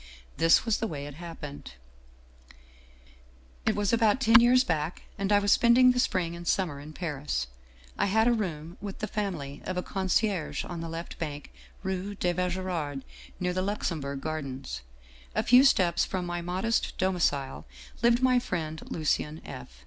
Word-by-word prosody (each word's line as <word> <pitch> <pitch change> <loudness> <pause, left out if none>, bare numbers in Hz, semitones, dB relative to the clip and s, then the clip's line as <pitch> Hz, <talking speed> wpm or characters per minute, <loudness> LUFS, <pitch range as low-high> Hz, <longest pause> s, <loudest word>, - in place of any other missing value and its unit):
" - - -27
This 165 +5 +5
was 225 -2 +2
the 225 - -1
way 145 -5 -5
it 145 - -8
happened: 150 - -8 1.0
" - - -27
It 220 - +3
was 205 +1 0
about 225 0 +4
ten 230 -3 +7
years 250 +2 +5
back, 165 -4 -2
and 195 0 -2
I 205 - +6
was 205 0 +2
spending 245 +2 +6
the 250 - 0
spring 175 -8 0
and 170 0 -9
summer 170 -7 0
in 150 +2 -9
Paris. 150 - -3 0.5
I - - +3
had 220 +3 +3
a 240 - +5
room 170 -7 -3
with 200 -2 -6
the - - -3
family 175 -11 -4
of 185 - -4
a 180 - -1
concierge 190 -1 0
on 170 -2 -6
the 165 - -5
left 165 +1 -7
bank, 150 -3 -5 0.3
rue 190 +1 -3
de 180 -2 0
Vaugirard, 175 -6 -2 0.4
near 180 0 0
the 185 - 0
Luxembourg 160 -8 -2
Gardens. 135 - -5 0.3
" 65 0 -24
A - - +2
few 250 +2 +7
steps 180 - +4
from 185 -2 -2
my 175 0 -3
modest 185 +6 -1
domicile 170 - 0 0.3
lived 235 +2 +4
my 255 -1 +5
friend 160 -8 -4
Lucien 155 0 -1
F. - - -8
175 Hz, 175 wpm, -28 LUFS, 150-205 Hz, 1.0 s, ten